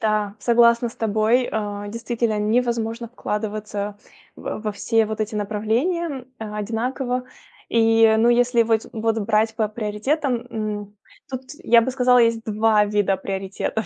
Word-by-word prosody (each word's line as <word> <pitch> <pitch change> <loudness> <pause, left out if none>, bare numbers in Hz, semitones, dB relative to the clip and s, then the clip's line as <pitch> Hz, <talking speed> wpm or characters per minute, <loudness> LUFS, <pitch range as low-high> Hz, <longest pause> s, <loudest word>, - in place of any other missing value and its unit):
Да, 210 -2 0
согласна 235 0 +4
с - - -16
тобой, 220 +3 +1
а, 205 -1 -3
действительно 230 0 -2
невозможно 230 +1 0
вкладываться 210 -2 -4 0.4
в - - -5
во 215 - -2
все 225 +2 +1
вот 220 0 -5
эти 215 +1 -3
направления, 245 - -1
м, 215 -1 -6
одинаково. 245 +4 -2 0.5
И, 225 -1 +4
ну, 230 +2 +4
если 240 0 +3
воть 225 -1 +1
вот 225 0 0
брать 220 +1 +1
по 220 -1 +1
приоритетам, 235 +5 -2
м, 210 -2 -5 0.3
тут 260 -1 -4 0.2
я 235 0 +6
бы 260 - -1
сказала, 250 -1 +4
есть 230 -1 +2
2 215 0 +3
вида 205 -2 +1
приоритетов. 195 +3 -3
225 Hz, 145 wpm, -22 LUFS, 210-235 Hz, 0.5 s, я